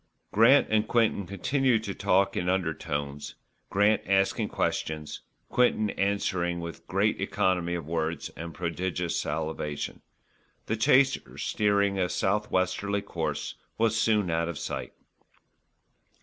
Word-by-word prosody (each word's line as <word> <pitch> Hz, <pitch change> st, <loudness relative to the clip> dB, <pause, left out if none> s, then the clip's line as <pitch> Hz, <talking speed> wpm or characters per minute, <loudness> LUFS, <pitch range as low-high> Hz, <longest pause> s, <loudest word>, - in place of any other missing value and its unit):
Grant 115 Hz, +7 st, +6 dB
and 110 Hz, 0 st, +2 dB
Quinton 110 Hz, -5 st, +1 dB
continued 115 Hz, -, +1 dB
to 100 Hz, -, -4 dB
talk 100 Hz, 0 st, +2 dB
in 90 Hz, -, -1 dB
undertones, 75 Hz, -6 st, -2 dB, 0.3 s
Grant 105 Hz, +2 st, +3 dB
asking 95 Hz, 0 st, +2 dB
questions, 75 Hz, -1 st, -2 dB, 0.3 s
Quinton 110 Hz, -4 st, +2 dB
answering 95 Hz, -3 st, 0 dB
with 85 Hz, 0 st, -8 dB
great -, -, +1 dB
economy 90 Hz, -2 st, 0 dB
of 85 Hz, -4 st, -5 dB
words 80 Hz, +1 st, -2 dB
and 85 Hz, +1 st, -8 dB
prodigious 85 Hz, +2 st, -2 dB
salivation. 75 Hz, -1 st, -3 dB, 0.6 s
The 110 Hz, -, -1 dB
chaser, 130 Hz, +5 st, +3 dB
steering 100 Hz, -1 st, +1 dB
a 90 Hz, -1 st, +1 dB
south 105 Hz, +3 st, 0 dB
westerly 100 Hz, +2 st, 0 dB
course, -, -, -3 dB, 0.2 s
was 115 Hz, 0 st, +2 dB
soon 105 Hz, -5 st, +2 dB
out 85 Hz, +1 st, 0 dB
of 85 Hz, -, -5 dB
sight. -, -, -5 dB
95 Hz, 120 wpm, -28 LUFS, 85-105 Hz, 0.6 s, Grant